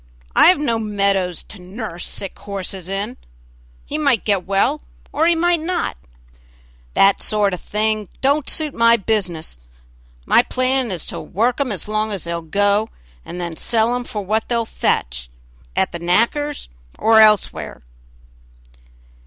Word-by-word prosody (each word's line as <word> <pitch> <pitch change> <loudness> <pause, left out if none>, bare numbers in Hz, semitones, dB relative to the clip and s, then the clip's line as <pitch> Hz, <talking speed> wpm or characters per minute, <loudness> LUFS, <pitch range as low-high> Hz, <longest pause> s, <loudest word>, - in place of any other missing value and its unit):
"I - - +7
have 360 - +6
no 235 -6 0
meadows 200 -4 0
to 205 - -10
nurse 185 -1 -6
sick 195 - -6
horses 190 -2 -6
in 205 +6 -3 0.7
he 300 - -3
might 280 -7 +2
get 200 -4 0
well 220 +10 +1 0.3
or 315 +3 +2
he 340 - +4
might 345 +1 +2
not; 345 +3 -2 1.0
that 195 0 +4
sort 210 -3 +1
of 180 - -5
thing 215 -1 -1
don't 280 +2 +1
suit 305 -3 0
my 230 0 +5
business; 180 - -2 0.7
my - - +5
plan 255 -1 0
is 180 -5 -4
to - - -4
work 235 +8 0
'em 265 -4 -1
as 195 -3 -4
long 215 0 -1
as 195 -3 -4
they'll 170 0 -3
go, 205 +5 +1 0.3
and 180 - -8
then 170 -2 -4
sell 230 +6 +1
'em 245 0 -2
for 210 -3 -5
what 220 +3 -1
they'll 235 -1 +1
fetch, - - -1 0.5
at - - +1
the 170 - -6
knacker's 235 - 0 0.3
or 220 0 +5
elsewhere." 205 - +3
215 Hz, 155 wpm, -20 LUFS, 190-245 Hz, 1.0 s, I